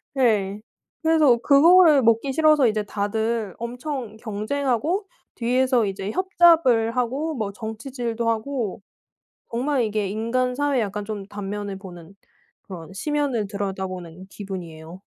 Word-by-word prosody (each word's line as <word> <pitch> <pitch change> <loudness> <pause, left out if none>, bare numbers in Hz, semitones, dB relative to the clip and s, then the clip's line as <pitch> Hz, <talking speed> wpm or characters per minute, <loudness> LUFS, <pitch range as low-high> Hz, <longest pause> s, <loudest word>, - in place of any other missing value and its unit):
네. 210 -6 +1 0.4
그래서 310 -7 +4
그거를 305 +3 +6
먹기 230 +3 +2
싫어서 305 -3 +4
이제 215 -1 0
다들 215 0 -2
엄청 245 -1 -5
경쟁하고 260 - -2 0.3
뒤에서 250 -1 +2
이제 195 +1 -4
협잡을 325 - +3
하고 270 +6 -1
뭐 215 -4 -3
정치질도 230 +2 -4
하고 225 -3 -2 0.7
정말 255 +3 0
이게 210 -2 -1
인간 230 +5 -1
사회에 285 -2 +1
약간 205 -1 -3
좀 205 -2 -6
단면을 205 -1 -5
보는 175 -2 -12 0.5
그런 180 -3 -10
심연을 275 -2 -1
들여다보는 190 -3 -5
기분이에요. 175 -4 -8
225 Hz, 280 characters per minute, -23 LUFS, 200-270 Hz, 0.7 s, 그거를